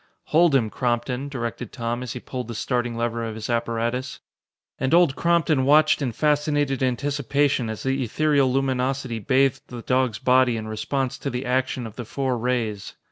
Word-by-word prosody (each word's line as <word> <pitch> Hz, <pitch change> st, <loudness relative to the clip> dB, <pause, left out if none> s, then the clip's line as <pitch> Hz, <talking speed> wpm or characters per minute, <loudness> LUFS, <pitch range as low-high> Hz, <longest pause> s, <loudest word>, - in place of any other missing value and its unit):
"Hold 160 Hz, -1 st, +4 dB
him, 110 Hz, -5 st, +2 dB
Crompton," 125 Hz, +2 st, -1 dB
directed 120 Hz, -3 st, -5 dB
Tom 120 Hz, -1 st, -3 dB
as 125 Hz, -, -5 dB
he 125 Hz, -, -6 dB
pulled 125 Hz, -1 st, -6 dB
the 120 Hz, -, -6 dB
starting 120 Hz, 0 st, -1 dB
lever 115 Hz, 0 st, -1 dB
of 110 Hz, -1 st, -4 dB
his 110 Hz, +2 st, -4 dB
apparatus. 120 Hz, +2 st, -2 dB, 0.6 s
And 130 Hz, +5 st, +2 dB
Old 170 Hz, -6 st, +4 dB
Crompton 170 Hz, -5 st, +2 dB
watched 155 Hz, +3 st, +4 dB
in 130 Hz, -4 st, -1 dB
fascinated 145 Hz, 0 st, +1 dB
anticipation 140 Hz, -1 st, 0 dB
as 110 Hz, -, -5 dB
the 135 Hz, 0 st, 0 dB
ethereal 140 Hz, +2 st, +2 dB
luminosity 130 Hz, -2 st, -1 dB
bathed 130 Hz, +4 st, +2 dB
the 120 Hz, -2 st, -8 dB
dog's 130 Hz, -4 st, +1 dB
body 125 Hz, -1 st, +3 dB
in 110 Hz, 0 st, -5 dB
response 130 Hz, +4 st, -2 dB
to 140 Hz, -, -3 dB
the 125 Hz, +1 st, -4 dB
action 130 Hz, -1 st, -1 dB
of 110 Hz, -, -10 dB
the 120 Hz, -, -5 dB
four 130 Hz, +2 st, -1 dB
rays. 115 Hz, -4 st, -2 dB
130 Hz, 175 wpm, -24 LUFS, 120-140 Hz, 0.6 s, Hold